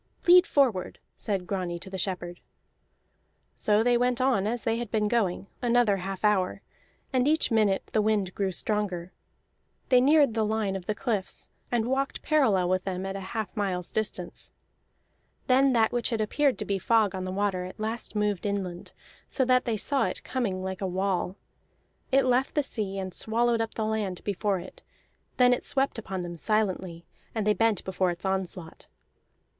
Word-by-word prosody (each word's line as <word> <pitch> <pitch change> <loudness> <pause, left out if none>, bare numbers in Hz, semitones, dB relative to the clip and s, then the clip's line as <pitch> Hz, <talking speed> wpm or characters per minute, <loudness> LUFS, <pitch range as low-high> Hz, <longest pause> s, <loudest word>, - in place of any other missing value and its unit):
"Lead 360 +2 +7
forward!" 245 -10 +1 0.2
said 195 -4 -3
Grani 180 -3 -3
to 185 - -8
the 190 - -4
shepherd. 175 -2 -3 1.1
So 210 +1 +2
they 240 0 +3
went 245 0 +1
on 250 -6 +2
as 235 +2 -2
they 225 0 0
had 240 -2 -4
been 215 -1 +1
going, 205 -5 0 0.2
another 240 -4 +3
half 190 +2 -4
hour, 195 -3 +1 0.5
and 255 +1 +2
each 315 -3 +2
minute 210 -4 +2
the 215 - +3
wind 205 -3 0
grew 195 -2 -1
stronger. 185 -2 -2 0.8
They 250 -1 +6
neared 285 -2 +5
the 220 -1 +1
line 215 -2 -1
of 185 -2 -6
the 215 - -1
cliffs, 210 -5 -3 0.2
and 235 -2 +1
walked 270 +2 -1
parallel 235 - +3
with 185 0 +1
them 190 -1 -3
at 195 0 -4
a - - -3
half 215 +3 -5
mile's 185 -4 -2
distance. 200 -5 -4 0.9
Then 265 +1 +4
that 225 -2 +3
which 240 -1 0
had 230 -3 -1
appeared 270 +6 +1
to 210 - -3
be 200 -1 -1
fog 220 0 +2
on 185 -1 -4
the 185 - -4
water 190 -1 -1
at 185 - -10
last 220 0 -4
moved 210 -2 0
inland, 190 -3 -4 0.3
so 260 - 0
that 255 0 +3
they 230 -3 0
saw 270 +6 +1
it - - -4
coming 200 -8 -2
like 190 0 -4
a 190 - 0
wall. 185 0 -1 0.8
It 270 0 +4
left 255 +1 +1
the 295 - +2
sea, 200 -6 -3
and 190 -1 -4
swallowed 230 +1 +1
up 225 - -4
the 220 - -1
land 215 -4 -2
before 205 0 0
it; - - -11 0.6
then 250 -1 +6
it 245 - -2
swept 270 -3 +1
upon 190 -4 -5
them 175 -1 -6
silently, 185 -4 -1 0.3
and 220 -2 -1
they 210 - +4
bent 225 0 +1
before 190 -1 0
its 175 +2 -5
onslaught. 185 -3 -4
210 Hz, 180 wpm, -27 LUFS, 190-240 Hz, 1.1 s, Lead